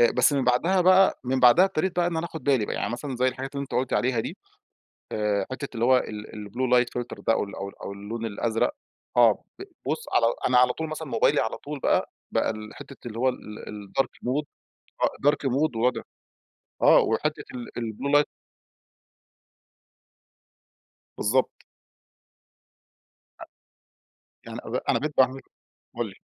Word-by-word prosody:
آآ، 120 - +6
بس 125 +4 +3
من 135 -2 +1
بعدها 165 +10 +3
بقى، 185 +2 +5
من 130 +1 0
بعدها 125 +9 +7
ابتديت 185 0 -1
بقى 175 -1 +3
إن 170 -2 -1
أنا 165 +1 -1
آخد 160 -2 -9
بالي 130 -7 +2
بقى، - - -3
يعني - - -2
مثلًا 130 +1 -4
زي 130 +1 +3
الحاجات 135 +2 -6
اللي 140 - -2
أنت 135 - -7
قُلت 130 0 0
عليها 125 -2 +1
دي، - - -5 0.8
آآ، 105 -1 0
حتة 140 +2 -4
اللي 115 +1 +1
هو 130 0 +6
ال 105 -2 -5
الblue 125 +2 +2
light 125 - +2 0.2
filter 120 - -9
ده 115 - +5
أو - - +1
ال 100 - -8
أو 100 +1 -5
ال - - -16
أو 100 - -5
اللون 110 +3 -6
الأزرق. 115 - 0 0.4
آه، - - +5 0.2
ب - - -6 0.2
بُصّ 470 - -2
على 115 - +4 0.2
أنا 125 -1 +3
على 125 0 +5
طول 160 -1 -4
مثلًا 155 0 -5
موبايلي - - +2
على 110 - -2
طول 145 -1 -7
بقى، - - +1 0.2
بقى - - +1
الحتة 110 +4 -8
اللي 115 0 -6
هو 130 +1 +3
ال 105 -4 -7 0.3
الdark 135 +7 0 0.2
mode 140 +4 0 0.6
آه 145 - +3
dark 140 -2 -2
mode 135 -1 +1
وضع 125 +2 +1 0.8
آه، - - +7
وحتة - - 0
ال 120 - -6
الblue 120 +5 -3
light 150 - +2 2.9
بالضبط. 130 +5 +2 1.9
أ - - -7 1.0
يعني - - -7
أب - - -6
أنا - - +3
بقيت 150 0 -4
باعمل 130 0 +3 0.6
قُل - - -2
لي. - - -14
125 Hz, 175 wpm, -26 LUFS, 115-145 Hz, 2.9 s, بعدها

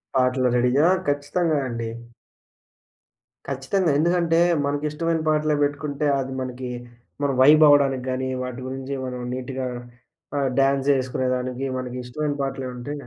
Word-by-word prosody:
పాటలు 130 0 +2
రెడీగా 125 +6 +3 0.2
ఖచ్చితంగా 145 +3 0
అండి. 115 -2 -4 1.6
ఖచ్చితంగా. 145 +6 0
ఎందుకంటే, 170 0 +2 0.3
మనకిష్టమైన 150 +3 -1
పాటలే 155 0 +2
పెట్టుకుంటే, 145 0 -2
అది 135 0 -4
మనకి 130 0 -5 0.6
మనం 140 -1 +1
వైబ్ 150 +3 +7
అవ్వడానికి 135 -3 +3
గానీ, 130 +1 -2 0.2
వాటి 125 0 -6
గురించి 135 +1 -5
మనం 125 -1 -5
నీట్‌‌గా 130 0 -4 0.7
ఆహ్, 140 -1 +1
డ్యాన్స్ 135 0 +2
యేసుకునేదానికి 130 0 -2
మనకి 125 -1 -5
ఇష్టమైన 145 +4 -3
పాటలె 135 -1 -3
ఉంటే. 125 +4 -6
135 Hz, 120 wpm, -23 LUFS, 130-150 Hz, 1.6 s, వైబ్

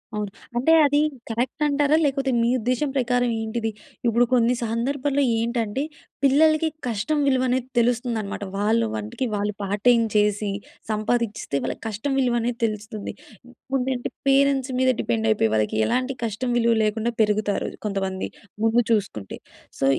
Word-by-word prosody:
అవును. 210 -2 -3 0.3
అంటే, 265 +7 +3
అది 290 +1 +3 0.3
కరెక్ట్ 240 +6 -2
అంటారా? 290 +1 +2
లేకపోతే 270 -1 0
మీ 230 - +2
ఉద్దేశ్యం 255 +5 0
ప్రకారం 245 -1 +1
ఏంటిది? 225 0 -2 0.4
ఇప్పుడు 235 +1 +4
కొన్ని 240 0 +4
సందర్భాల్లో 275 +5 0 0.2
ఏంటంటే, 235 +2 -1 0.4
పిల్లలకి 310 +3 +4 0.2
కష్టం 235 +7 -1
విలువ 260 -1 +3
అనేది 255 0 0
తెలుస్తుందనమాట. 230 -4 -1
వాళ్ళ 215 +3 +2 0.2
వంటికి 110 - -3
వాళ్ళు 205 0 -1
పార్ట్ 200 +1 -3
టైమ్ 235 -2 +5
చేసి, 210 -1 +2 0.4
సంపాదించిస్తే 215 -6 -1
వాళ్ళకి - - -4
కష్టం 220 +6 -2
విలువ 250 -2 +2
అనేది 235 +1 -2
తెలుస్తుంది. 215 -1 -5 0.6
ముందంటే 255 -1 -1 0.2
పేరెంట్స్ 275 -1 +3
మీద 260 0 +3
డిపెండ్ 110 -1 0
అయిపోయి, 110 0 +2
వాళ్ళకి 110 0 0
ఎలాంటి 255 +1 0
కష్టం 230 +3 -2
విలువ 235 -1 +3
లేకుండా 220 +2 0
పెరుగుతారు, 210 -1 +1 0.2
కొంతమంది 195 -2 -2 0.3
ముందు 230 +2 +4
చూసుకుంటే. 195 - -1 0.4
సో, - - +1
235 Hz, 140 wpm, -24 LUFS, 210-260 Hz, 0.6 s, టైమ్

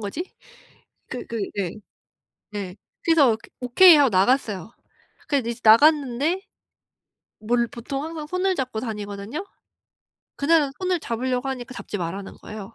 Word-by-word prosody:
거지?' 215 - -4 0.8
그 250 - -6
그 230 - -4 0.2
네. 190 -4 -2 0.8
네. 200 -3 -6 0.3
그래서 290 -9 +4 0.2
"오케이." 315 +8 +7
하고 285 -3 +4
나갔어요. 200 -1 +1 0.6
그래서 270 -5 0
이제 235 0 -4
나갔는데 290 - +4 1.0
뭘 235 +2 +1
보통 270 +5 -5
항상 315 -2 -6
손을 370 +2 0
잡고 255 -7 -3
다니거든요. 210 - -5 0.9
그날은 290 -1 +3
손을 365 -1 +1
잡으려고 250 +2 -2
하니까 255 -2 -5
"잡지 - - -6
마라."는 190 +3 -5
거예요. 210 -2 -9
250 Hz, 285 characters per minute, -24 LUFS, 215-300 Hz, 1.0 s, 오케이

